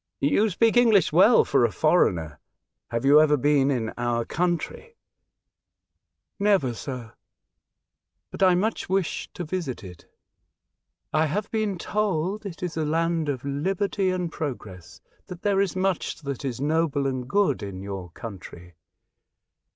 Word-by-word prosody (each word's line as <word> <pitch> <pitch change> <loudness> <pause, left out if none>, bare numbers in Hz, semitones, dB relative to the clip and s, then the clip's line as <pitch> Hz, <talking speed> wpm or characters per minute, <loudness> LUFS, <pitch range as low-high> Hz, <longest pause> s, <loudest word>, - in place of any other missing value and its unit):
"You 205 +10 +2
speak 225 +5 +2
English 225 -7 +4
well - - +6
for - - +2
a - - +2
foreigner. 80 -3 +1 0.5
Have 115 +2 -2
you 145 +2 +7
ever 150 -1 +4
been 145 0 +3
in 120 -5 -1
our 120 -1 0
country 180 - -2 0.5
?" - - -60
'' - - -57
Never, 145 -12 +2
sir, 120 -2 -7 1.2
but - - -9
I 185 -2 +5
much 210 +3 -1
wish 190 -3 -1
to 175 - -4
visit 160 -8 -4
it. 90 -3 -12 1.1
I 155 +1 +3
have 200 +7 -3
been 215 -4 -1
told 200 +1 -1
it 180 -1 -9
is 175 -2 -3
a 160 - -1
land 165 0 0
of 135 -2 -3
liberty 190 +7 -1
and 180 -2 -2
progress, 95 - -7 0.3
that 180 -1 -9
there 200 -1 +2
is 195 -2 -1
much 185 -3 -1
that 140 -2 -5
is 130 -3 -3
noble 150 -1 0
and 130 -2 -3
good 200 -1 +2
in 100 -2 -6
your 95 -3 -6
country. 90 -3 -10
155 Hz, 150 wpm, -25 LUFS, 125-190 Hz, 1.2 s, you